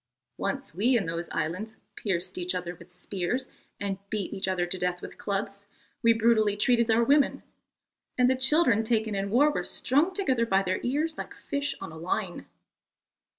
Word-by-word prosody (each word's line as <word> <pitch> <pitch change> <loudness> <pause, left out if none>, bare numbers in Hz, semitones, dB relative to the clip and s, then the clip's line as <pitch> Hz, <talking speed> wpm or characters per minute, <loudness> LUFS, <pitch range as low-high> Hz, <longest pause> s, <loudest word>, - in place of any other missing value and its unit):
Once 275 -1 -2
we 235 +8 +3
in 200 - -1
those 170 +1 -3
islands 205 +8 -3 0.2
pierced 185 -2 -2
each 180 +1 -1
other 180 -1 -3
with 170 +1 -16
spears 190 +7 -3 0.3
and 195 -1 -2
beat 210 -3 -3
each 190 - -2
other 185 -2 +1
to 185 +1 -2
death 180 0 -1
with - - -9
clubs; 200 0 -3 0.3
we 230 - +6
brutally 220 -2 +3
treated 235 +1 +3
our 225 +1 +4
women, 280 +3 +3 0.7
and 250 -1 +5
the 260 - +3
children 260 -4 +4
taken 220 -1 +1
in 200 0 -1
war 280 +8 +4
were - - -2
strung 295 +8 +1
together 260 - +1
by 195 -2 +3
their 185 0 -1
ears 305 +6 -1
like - - -6
fish 285 -1 -3
on - - -7
a 160 - -10
line. 180 +2 -3
215 Hz, 180 wpm, -28 LUFS, 185-250 Hz, 0.7 s, we